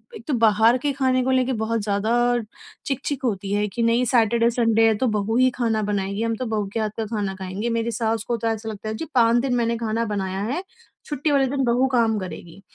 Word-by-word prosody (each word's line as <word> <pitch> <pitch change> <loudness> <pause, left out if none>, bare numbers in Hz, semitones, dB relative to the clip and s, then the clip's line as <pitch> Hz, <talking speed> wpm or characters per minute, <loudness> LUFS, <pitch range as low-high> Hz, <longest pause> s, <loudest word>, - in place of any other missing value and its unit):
एक - - -10
तो 300 - 0
बाहर 225 0 +4
के 290 - +1
खाने 260 -2 +1
को 260 - 0
लेके 260 0 +2
बहुत 225 -1 -1
ज़्यादा 205 +2 0 0.7
चिक-चिक 275 0 -3
होती 200 -4 -2
है 205 +1 +1
कि, 235 +4 -3
"नहीं, 230 +2 +2
सैटरडे-संडे 230 -1 +3
है, 220 - +3
तो 255 - +1
बहू 210 +2 -1
ही 255 0 +5
खाना 225 -3 0
बनाएगी। 200 +1 -2
हम 230 0 0
तो 255 - -4
बहू 215 -3 -2
के - - -1
हाथ 215 -1 0
का 225 - -2
खाना 205 -3 -3
खाएँगे।" 190 +4 -4
मेरी 230 0 -1
सास 225 -1 -1
को 240 -1 0
तो 230 - -2
ऐसा 225 0 -2
लगता 215 0 -6
है, 220 - -3
"जी, 325 - -5
5 235 -1 +5
दिन 260 -2 0
मैंने 235 -1 0
खाना 230 0 -1
बनाया 190 -1 -3
है, 350 +5 -3 0.4
छुट्टी 295 +1 -1
वाले 275 -1 +3
दिन 270 +1 -1
बहू 245 +2 +2
काम 225 -3 +3
करेगी।" 185 -1 -9
230 Hz, 230 wpm, -23 LUFS, 215-245 Hz, 0.7 s, ही